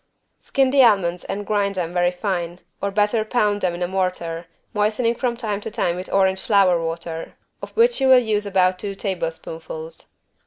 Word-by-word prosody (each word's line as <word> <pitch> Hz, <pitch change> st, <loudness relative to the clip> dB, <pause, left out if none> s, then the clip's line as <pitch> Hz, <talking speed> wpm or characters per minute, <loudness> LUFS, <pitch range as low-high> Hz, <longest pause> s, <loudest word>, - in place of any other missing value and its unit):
Skin 270 Hz, -1 st, +1 dB
the 275 Hz, 0 st, +5 dB
almonds 180 Hz, -6 st, +3 dB
and 205 Hz, +1 st, -4 dB
grind 200 Hz, -1 st, 0 dB
them 175 Hz, -2 st, -3 dB
very 175 Hz, 0 st, +3 dB
fine, 180 Hz, -1 st, -3 dB, 0.2 s
or 200 Hz, -, 0 dB
better 210 Hz, +2 st, +1 dB
pound 210 Hz, -2 st, 0 dB
them 175 Hz, -2 st, 0 dB
in 175 Hz, -, -3 dB
a -, -, 0 dB
mortar, 175 Hz, -3 st, -2 dB, 0.3 s
moistening 215 Hz, +3 st, +1 dB
from 240 Hz, -1 st, -2 dB
time 210 Hz, -4 st, -3 dB
to 225 Hz, -, -5 dB
time 175 Hz, -4 st, -1 dB
with 185 Hz, +1 st, -7 dB
orange 190 Hz, -1 st, +2 dB
flower 185 Hz, -5 st, +3 dB
water, 165 Hz, 0 st, -5 dB, 0.3 s
of -, -, -6 dB
which 475 Hz, -, +4 dB
you 265 Hz, -, +3 dB
will 260 Hz, -1 st, +8 dB
use 215 Hz, -4 st, 0 dB
about 185 Hz, -2 st, +2 dB
two 200 Hz, -1 st, -5 dB
tablespoonfuls. 165 Hz, -4 st, -5 dB
195 Hz, 185 wpm, -22 LUFS, 175-215 Hz, 0.3 s, will